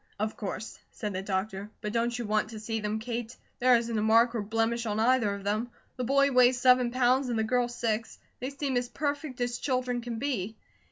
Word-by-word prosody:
"Of 215 +1 -2
course," 215 +1 -5
said 210 -2 -5
the 185 - -2
doctor. 195 +1 -3
"But 210 -1 -4
don't 235 +1 0
you 240 - -3
want 215 0 +1
to 220 -1 -7
see 225 +1 -3
them, 210 0 -2
Kate? 235 +1 -5 0.2
There 250 0 +6
isn't 230 -1 0
a - - 0
mark 230 +2 +4
or 230 - -1
blemish 225 +2 0
on 210 0 -1
either 230 -3 +3
of 200 - -9
them. 215 +4 -1 0.3
The 255 - -3
boy 275 +3 +3
weighs 250 -1 +5
seven 250 -1 +5
pounds 255 +1 +2
and 235 - 0
the 220 - +2
girl 245 +2 +1
six; 230 -2 -2 0.2
they 255 - -3
seem 275 -2 -2
as 245 0 -1
perfect 285 -2 -3
as 245 0 -1
children 255 -2 -1
can 235 -1 -5
be." 225 -5 -2
235 Hz, 220 wpm, -29 LUFS, 215-250 Hz, 0.3 s, There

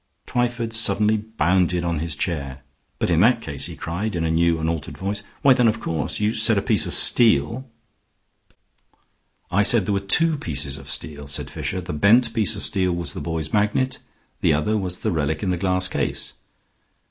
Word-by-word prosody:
Twyford 120 -2 -2
suddenly 110 -1 +3
bounded 90 -4 0
on 85 -2 -1
his 80 -1 -3
chair. 70 -5 -3 0.3
"But - - -1
in 80 - +3
that 115 +5 +4
case," 70 -10 -2
he - - -8
cried, 95 +5 -4
in 85 - -2
a 80 - 0
new 85 0 +2
and 80 0 -3
altered 80 -2 -4
voice, 100 +2 -3 0.2
"why 135 - +7
then 125 -2 +2
of 110 0 0
course 80 -7 -2
You 105 +1 0
said 110 -1 +4
a - - +1
piece - - +2
of - - -2
steel 120 +2 +3 0.9
?" - - -43
"I 100 - +2
said 105 -1 +4
there 100 - -1
were 100 - +1
two 155 +11 +2
pieces 70 - -2
of 70 - -9
steel," 75 -3 -4
said 70 -1 -2
Fisher. 80 +3 -4
"The 90 0 -6
bent 115 +9 +3
piece 110 -1 +2
of 100 - -7
steel 95 -3 -1
was 85 0 -4
the 95 - -6
boy's 80 -1 -4
magnet. 105 +5 0 0.4
The - - +3
other 75 +9 0
was 90 -4 -3
the - - -2
relic 80 -1 -2
in 95 - 0
the - - 0
glass 90 0 +1
case." - - -3
95 Hz, 200 wpm, -22 LUFS, 80-110 Hz, 0.9 s, why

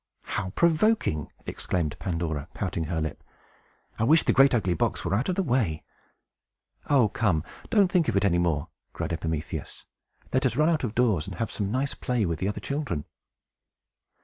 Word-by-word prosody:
"How 95 -2 -3
provoking!" 170 - +2
exclaimed 80 -5 -2
Pandora, 85 -5 -2
pouting 85 -4 -2
her 80 +1 -2
lip. 80 0 -4 0.8
"I - - +2
wish 155 +8 +5
the - - +2
great 135 +1 +6
ugly 100 -7 +1
box 80 - -1
were - - 0
out 120 - +1
of 180 - +1
the 195 - +1
way!" 115 - 0 1.1
"Oh 130 -6 +5
come, 95 -7 +1 0.3
don't 200 -4 +4
think 175 -4 +3
of - - 0
it 100 - +3
any 85 -3 +3
more," 80 -5 0 0.2
cried - - -3
Epimetheus. 80 -2 -4 0.5
"Let - - +3
us - - -3
run 155 +2 +4
out 160 -4 +1
of 115 -3 -2
doors, 110 -9 +2
and 95 - -6
have 115 - -2
some 100 -2 -2
nice 135 +3 0
play 125 -4 -1
with 85 -3 -2
the 95 - -1
other 105 - -2
children." 140 - -3
100 Hz, 180 wpm, -27 LUFS, 85-135 Hz, 1.1 s, great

